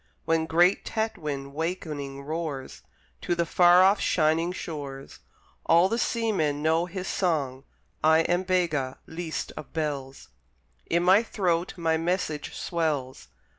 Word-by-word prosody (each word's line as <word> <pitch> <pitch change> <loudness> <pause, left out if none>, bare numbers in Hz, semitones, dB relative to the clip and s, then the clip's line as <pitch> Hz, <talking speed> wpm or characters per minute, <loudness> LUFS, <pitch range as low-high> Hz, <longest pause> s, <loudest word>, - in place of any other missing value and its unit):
When 160 0 +1
great 175 +4 +3
Tatwin 150 - -3
wakening 150 -4 -4
roars 155 -3 -5 0.4
To 175 - -1
the 170 0 0
far 175 +2 +6
off 195 +2 +4
shining 160 +1 +2
shores, 140 -6 -7 0.5
All 170 +3 +5
the 230 - -1
seamen 190 -14 0
know 160 +2 +2
his 185 +1 -5
song. 140 -7 -1 0.4
I 160 +1 +5
am 175 +2 +1
Bega, 170 -8 0
least 160 0 -5
of 150 - -9
bells; 140 - -4 0.6
In 170 +1 +2
my 190 +4 +6
throat 180 -6 -1
my 165 -1 +1
message 165 -2 -2
swells. 150 -7 -2
165 Hz, 130 wpm, -26 LUFS, 150-180 Hz, 0.6 s, far